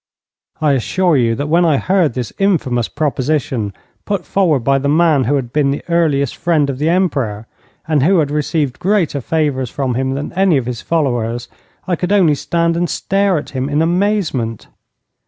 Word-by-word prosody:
I 155 -2 +2
assure 170 +6 +1
you 115 -3 +2
that 145 - -3
when 170 +3 +3
I 160 -4 +3
heard 180 -5 +1
this 125 -4 -4
infamous 150 - +1
proposition 135 -7 -1 0.3
put 200 -4 -3
forward 170 -9 +1
by 135 +3 +2
the 140 +1 -1
man 155 -3 +3
who 145 +5 +1
had 125 -4 -3
been 150 -2 +2
the 140 - -2
earliest 150 -6 +1
friend 160 -5 +1
of 130 - -7
the 155 +2 +1
Emperor, 135 - 0 0.4
and 155 -3 +2
who 185 +7 +3
had 150 -3 +1
received 150 -2 -1
greater 180 -7 0
favours 140 -3 -1
from 130 -1 -2
him 130 +2 -1
than 145 +2 -5
any 185 -3 +3
of 130 - -2
his 120 -1 -4
followers, 120 -7 -1 0.4
I 180 - +1
could 180 +2 -3
only 185 -7 +4
stand 170 +3 0
and 175 +1 -1
stare 195 -2 0
at 150 - -6
him 130 0 -3
in 145 +1 0
amazement. 170 - -1
150 Hz, 185 wpm, -16 LUFS, 130-170 Hz, 0.4 s, only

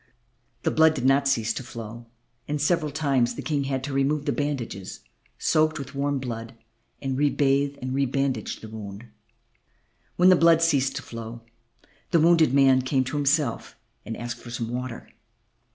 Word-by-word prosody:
The - - +1
blood 160 0 +4
did 130 -3 -3
not 135 +1 +4
cease 115 -5 +1
to - - -5
flow, 115 -1 -9 0.4
and 150 0 -2
several 155 +1 +1
times 140 -5 +1
the - - -6
King 145 -3 -1
had 135 -1 -2
to 140 0 -4
remove 140 +2 +1
the - - +1
bandages, 130 -10 -4 0.4
soaked 155 0 +2
with 135 -1 -7
warm 140 0 -1
blood, 115 -3 -6 0.5
and 135 -1 -2
rebathe 140 -1 +2
and 130 0 -3
rebandage 135 0 -1
the 110 - -8
wound. 105 0 -8 1.1
When 180 +1 +5
the 185 - +8
blood 165 -1 +5
ceased 140 -5 +2
to - - -4
flow, 115 0 -8 0.7
the 170 - +3
wounded 165 -3 +5
man 135 -1 +5
came 130 +1 +1
to 130 +3 -5
himself 145 -3 0 0.3
and 115 - -6
asked 120 0 -5
for 120 - -10
some 115 -1 -4
water. 125 -1 -5
135 Hz, 170 wpm, -25 LUFS, 120-145 Hz, 1.1 s, the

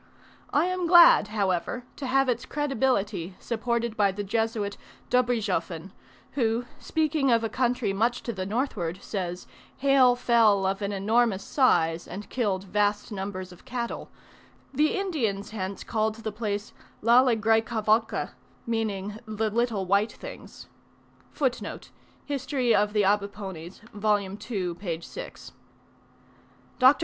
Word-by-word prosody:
I - - +3
am 365 -1 -1
glad, 345 - +8
however, 205 +2 -1
to 275 - -4
have 270 +1 +3
its 245 0 -1
credibility 225 - -1
supported 235 0 -2
by 205 -2 +3
the 205 +2 -4
Jesuit 220 -1 -1 0.4
Dobrizhoffen, 200 -9 0 0.4
who, 235 -2 0
speaking 310 -3 0
of 230 -1 +3
a 225 - -1
country 245 -5 0
much 235 +5 0
to 235 - -3
the 190 -2 -4
northward, 200 -7 -2
says, 180 -3 -4 0.3
hail 265 -2 +5
fell 225 -5 +4
of 195 +2 -1
an 200 0 -1
enormous 205 +1 +1
size 165 - +2
and 205 +2 -8
killed 200 -7 0
vast 205 +2 0
numbers 190 -2 -5
of 180 - -15
cattle: 245 -2 -4 0.6
the 300 +6 +2
Indians 240 - -2
hence 195 -2 -4
called 220 -1 0
the 220 -1 -5
place 210 -1 -4 0.3
Lalegraicavalca, 225 -2 +3 0.3
meaning 215 -3 -2
"the 215 0 -1
little 225 -3 0
white 200 +4 +2
things." - - -10 0.7
Dr. 265 -5 -2
220 Hz, 105 wpm, -27 LUFS, 200-245 Hz, 0.7 s, glad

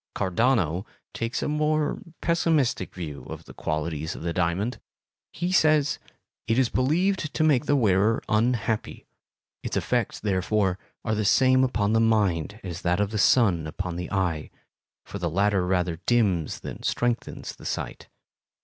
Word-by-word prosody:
Cardano 95 - +1 0.3
takes 115 +1 -2
a - - -1
more 150 0 0 0.2
pessimistic 160 - +1
view 75 -7 -6
of - - -8
the - - -12
qualities 80 0 -3
of - - -8
the 85 0 -2
diamond. 90 +7 -1 0.5
He 175 +2 -2
says: 155 -5 +3 0.5
It 115 - +2
is 130 -2 +3
believed 160 +5 +1
to 155 - +2
make 150 -3 +3
the 145 - +4
wearer 110 -2 +3
unhappy; 110 0 0 0.6
its - - -3
effects - - -1
therefore 95 -1 0 0.3
are 110 - 0
the 105 0 0
same 130 +4 +4
upon 110 -5 +1
the 115 - +4
mind 105 -4 +1
as 90 -1 -6
that 90 +2 +1
of 105 0 0
the 110 - -2
sun 95 -8 +4
upon 90 +2 -4
the 90 +1 -5
eye, 90 -6 -1 0.6
for 100 - -7
the 85 -2 -1
latter 95 +1 +1
rather 90 -2 0
dims 100 -10 +1
than - - -7
strengthens 120 -1 -2
the - - -14
sight. - - -4
105 Hz, 155 wpm, -26 LUFS, 90-130 Hz, 0.6 s, the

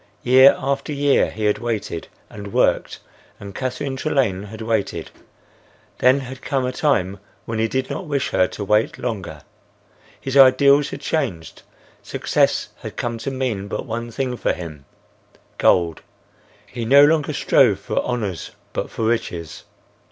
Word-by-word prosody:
Year 130 +2 +7
after 140 +2 -2
year 145 -1 +2
he 110 0 -4
had 105 - +2
waited 110 -8 -3 0.2
and 100 -1 -9
worked - - +1 0.4
and 100 -1 -9
Catherine 130 +3 -3
Trelane 125 -9 0
had 110 +2 -8
waited; 110 -3 -2 0.9
then 130 +2 +4
had 130 0 -9
come 135 -2 -1
a 125 - -1
time 100 - 0 0.3
when 115 -1 -3
he 110 - +2
did 130 +3 -2
not 185 - -5
wish 140 -3 -1
her 90 - +3
to 105 - -6
wait 105 +2 +1
longer. 100 - -5 0.8
His 135 0 -5
ideals 140 +2 +6
had - - -7
changed. 110 - -3 0.4
Success - - 0
had - - -9
come 120 -1 -3
to 110 - -3
mean 125 -7 -3
but - - -4
one 115 +1 -4
thing 125 +1 -3
for - - 0
him: 80 -5 -9 0.7
gold; 85 -3 +3 0.6
he 120 - -6
no 140 +5 +7
longer 150 -1 +2
strove 120 -7 +3
for - - -2
honors 105 -8 -3 0.2
but - - -3
for - - -5
riches. 90 -8 -3
120 Hz, 150 wpm, -21 LUFS, 100-135 Hz, 0.9 s, Year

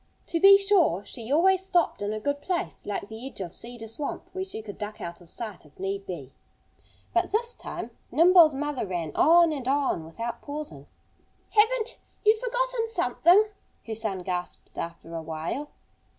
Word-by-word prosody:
To 335 - -1
be 395 +2 +9
sure, 375 - +3
she 230 +4 -8
always 375 +5 +4
stopped 355 - +1
in 205 +1 -1
a 215 - -3
good 285 +5 -2
place, 360 +2 -3
like 200 -1 -3
the 220 +4 -7
edge 270 - -9
of 180 -3 -4
Cedar 235 +3 -8
Swamp, 280 +6 -5
where 375 - -2
she 380 - -7
could 205 -2 -9
duck 210 0 -5
out 170 +1 -7
of 170 - -16
sight 215 -3 -7
if 150 -1 -21
need 195 +1 -3
be. 145 -8 -7 0.8
But 350 +1 +2
this 470 +3 0
time - - -7 0.2
Nimble's 335 -3 +7
mother 285 -5 -2
ran 170 -4 -3
on 335 +1 +6
and 270 -4 -5
on 270 - +1
without 230 +9 -5
pausing. 300 +1 -7 0.6
"Haven't 445 +2 +2 0.3
you 430 +1 +7
forgotten - - -1
something?" 365 - +4 0.4
her 225 - -4
son 210 -4 -3
gasped 180 -1 -5
after 165 0 -6
a 165 - -3
while. 160 - -4
270 Hz, 175 wpm, -27 LUFS, -, 0.8 s, be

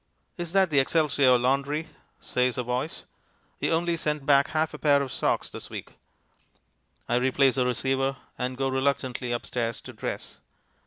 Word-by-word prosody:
"Is 175 -2 -5
that 190 -3 +4
the 145 - +5
Excelsior 140 -3 +4
Laundry?" 140 +5 0 0.3
says 125 0 0
a 125 - 0
voice. 125 +6 -3 0.6
"You - - 0
only 170 +1 +1
sent 150 -3 -2
back 140 -1 +5
half 155 0 0
a - - -7
pair 145 -2 +4
of 135 -2 -3
socks - - 0
this - - -8
week." - - -8 1.1
I 120 - +2
replace 130 +1 +3
the 125 0 +1
receiver 135 +2 0 0.2
and 125 +1 -3
go 135 0 0
reluctantly 130 -2 -1
upstairs 120 -1 -2
to - - -10
dress. - - -6
135 Hz, 160 wpm, -27 LUFS, 125-150 Hz, 1.1 s, the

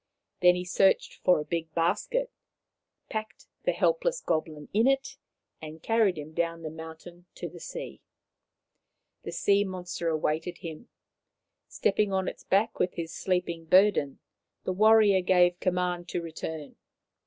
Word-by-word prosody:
Then 180 0 +6
he 180 0 -4
searched 190 +2 +2
for 180 -3 +5
a 150 - -4
big 165 -1 -3
basket, 210 - 0 0.8
packed 215 0 -6 0.2
the - - +3
helpless - - +1
goblin 155 -2 -2
in 225 +5 +4
it, 270 0 +1 0.5
and 155 +1 -9
carried 225 -6 +2
him 150 +1 -8
down 165 0 -2
the 155 - -5
mountain 160 +2 -11
to - - -5
the - - -11
sea. - - -7 1.2
The - - -6
sea 200 0 +2
monster 180 -3 -5
awaited 160 +2 -1
him. 165 +6 -9 0.8
Stepping 205 0 +1
on 190 -1 0
its - - -6
back 205 +4 +1
with 180 - 0
his 165 -1 -5
sleeping 175 -3 -2
burden, 185 -5 +4 0.5
the 185 - -1
warrior 210 -1 +5
gave 180 -1 +3
command 180 -1 -1
to 175 - -2
return. 160 -2 -7
180 Hz, 140 wpm, -28 LUFS, 165-200 Hz, 1.2 s, Then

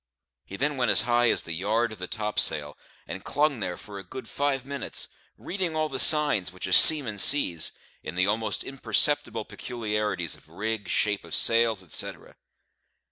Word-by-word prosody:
He 100 - -10
then 145 +1 -2
went 125 -2 0
as - - +3
high 120 0 +1
as - - +1
the 85 - -7
yard 110 +7 -1
of 110 - -11
the 90 - -6
topsail, 105 - +2 0.3
and - - -8
clung 145 -3 -1
there 90 -3 -5
for 100 -2 -10
a - - -9
good 115 +6 -10
five 140 -2 -3
minutes, 140 -2 -3 0.3
reading 180 -4 -4
all 155 0 -2
the 135 -2 -5
signs 150 - +4
which 90 - -8
a 95 - -4
seaman 130 - +7
sees 90 - +3 0.3
in - - -8
the 90 +1 +1
almost 105 +1 -2
imperceptible 125 -2 -1
peculiarities 105 - -4
of - - -15
rig, 105 +4 -5
shape 105 -1 -1
of - - -6
sails, 115 -3 +3
etcetera. 85 - -5
110 Hz, 175 wpm, -25 LUFS, 100-135 Hz, 0.3 s, seaman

